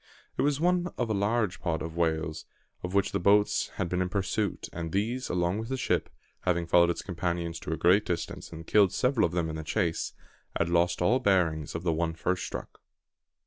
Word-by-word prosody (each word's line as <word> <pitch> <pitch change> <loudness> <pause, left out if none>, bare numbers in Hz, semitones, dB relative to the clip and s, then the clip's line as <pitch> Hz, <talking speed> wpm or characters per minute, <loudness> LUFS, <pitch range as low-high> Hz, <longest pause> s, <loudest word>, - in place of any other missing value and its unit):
It - - 0
was 145 0 +2
one 180 +1 +2
of 120 -3 -1
a - - +2
large 105 -1 0
"pod" 80 -3 -1
of 80 0 -6
whales, 80 -1 -1 0.3
of 90 +2 -4
which 100 - +2
the - - 0
boats 100 +3 +3
had 95 - -1
been 90 +1 -1
in 90 - 0
pursuit, 100 0 -1
and 80 -1 -4
these, 115 +7 -1
along 90 +3 0
with 110 +1 -5
the 130 - -1
ship, 125 - 0 0.3
having 85 -1 0
followed 85 +1 +5
its 85 - -2
companions 85 -2 -3
to 80 - -6
a 80 - -1
great 95 +4 +4
distance, 90 - -4
and 80 0 -8
killed 100 -2 +4
several 125 -7 +2
of - - -9
them 85 -2 0
in 80 0 -4
the 80 - -5
chase, 80 +1 -1 0.4
had - - 0
lost 85 +1 +2
all 125 +8 +4
bearings 85 - +1
of 85 - -4
the 85 -2 +1
one 80 0 -1
first 90 +2 -1
struck. - - -7
90 Hz, 215 wpm, -28 LUFS, 85-105 Hz, 0.4 s, followed